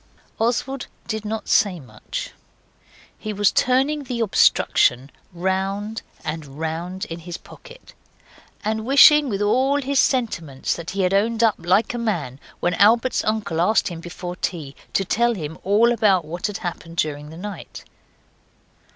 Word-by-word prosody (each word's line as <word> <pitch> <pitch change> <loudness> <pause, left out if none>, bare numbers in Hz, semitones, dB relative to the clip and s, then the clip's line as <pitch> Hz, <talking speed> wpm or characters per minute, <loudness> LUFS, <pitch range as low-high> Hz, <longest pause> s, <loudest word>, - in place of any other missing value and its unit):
Oswald 245 +3 -1 0.2
did 220 -1 -4
not 220 +1 -4
say 190 -4 +3
much. 110 -7 -7 0.9
He 215 - -4
was 205 0 +3
turning 275 +4 +1
the 240 -2 -3
obstruction 135 - +3 0.2
round 195 +4 -2 0.2
and 150 -3 -5
round 170 +5 -4
in 165 -4 -7
his 170 +1 -7
pocket, - - -15 0.7
and 220 +1 -1
wishing 280 +3 +7
with 205 -2 -1
all 260 +7 +2
his 275 -1 0
sentiments 170 - 0
that 170 -1 -7
he 195 0 -1
had 180 +1 +1
owned 225 +3 +2
up 225 -2 +5
like 180 +8 +2
a 240 - -3
man 165 - -2 0.2
when 175 - +1
Albert's 230 +7 +3
uncle 215 -7 -1
asked 215 +4 +2
him 170 -2 -7
before 175 +1 -7
tea 155 -7 -4 0.2
to 195 - +1
tell 235 +4 +1
him 160 -3 -6
all 215 +5 +4
about 205 -7 +3
what 175 +6 -3
had 210 - -4
happened 165 -1 -6
during 150 -2 -2
the 160 - -10
night. 205 +3 -8
200 Hz, 150 wpm, -22 LUFS, 170-230 Hz, 0.9 s, wishing